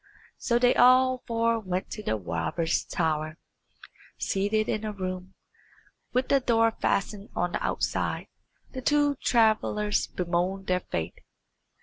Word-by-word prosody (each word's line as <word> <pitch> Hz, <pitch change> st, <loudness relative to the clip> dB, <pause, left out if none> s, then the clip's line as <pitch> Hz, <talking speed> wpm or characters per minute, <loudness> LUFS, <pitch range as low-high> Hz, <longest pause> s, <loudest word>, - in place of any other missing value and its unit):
So 235 Hz, -, +1 dB
they 245 Hz, 0 st, +4 dB
all 255 Hz, +1 st, +5 dB
four 230 Hz, 0 st, +1 dB
went 185 Hz, -3 st, -4 dB
to 215 Hz, -, -5 dB
the 110 Hz, -, -1 dB
robbers' 105 Hz, -, -1 dB
tower. 155 Hz, -1 st, -1 dB, 0.8 s
Seated 205 Hz, +2 st, 0 dB
in 215 Hz, -, -1 dB
a 215 Hz, -, -2 dB
room, 185 Hz, -2 st, -5 dB, 0.8 s
with 255 Hz, +1 st, 0 dB
the 275 Hz, -, +5 dB
door 230 Hz, -3 st, +3 dB
fastened 205 Hz, -1 st, -2 dB
on 175 Hz, -, 0 dB
the -, -, -3 dB
outside, -, -, -1 dB, 0.5 s
the 260 Hz, -, -6 dB
two 290 Hz, +1 st, +3 dB
travellers 215 Hz, -3 st, +2 dB
bemoaned 180 Hz, +2 st, -2 dB
their 180 Hz, -1 st, +1 dB
fate. 80 Hz, -, -5 dB
210 Hz, 130 wpm, -27 LUFS, 180-235 Hz, 0.8 s, all